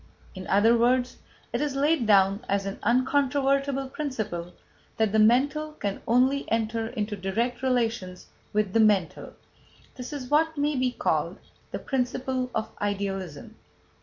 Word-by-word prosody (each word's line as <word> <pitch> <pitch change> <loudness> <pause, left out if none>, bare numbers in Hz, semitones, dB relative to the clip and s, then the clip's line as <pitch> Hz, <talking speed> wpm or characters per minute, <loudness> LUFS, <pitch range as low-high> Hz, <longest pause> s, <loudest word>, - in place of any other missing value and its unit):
" - - -27
In 185 -1 -8
other 220 +4 +4
words, 250 +2 +2 0.4
it - - 0
is 295 -2 -1
laid 285 -3 +2
down 200 +1 +4
as 200 0 0
an 195 0 -5
uncontrovertible 275 +2 +1
principle 215 - -4 0.5
that 220 -2 +2
"the 220 - +2
mental 280 +8 +3
can 200 -9 -4
only 260 +4 +2
enter 225 0 0
into 215 -3 -3
direct 225 +6 -2
relations 230 -8 -1 0.3
with 210 -2 0
the 225 - +3
mental." 205 -6 +2 0.6
That 250 +1 -8
is 280 -4 -6
what 320 +1 +2
may 295 +1 +1
be 255 -1 +1
called - - -1 0.3
"the - - -4
principle 255 0 -2
of 220 0 -2
Idealism." 195 -6 -4
235 Hz, 145 wpm, -26 LUFS, 205-270 Hz, 0.6 s, other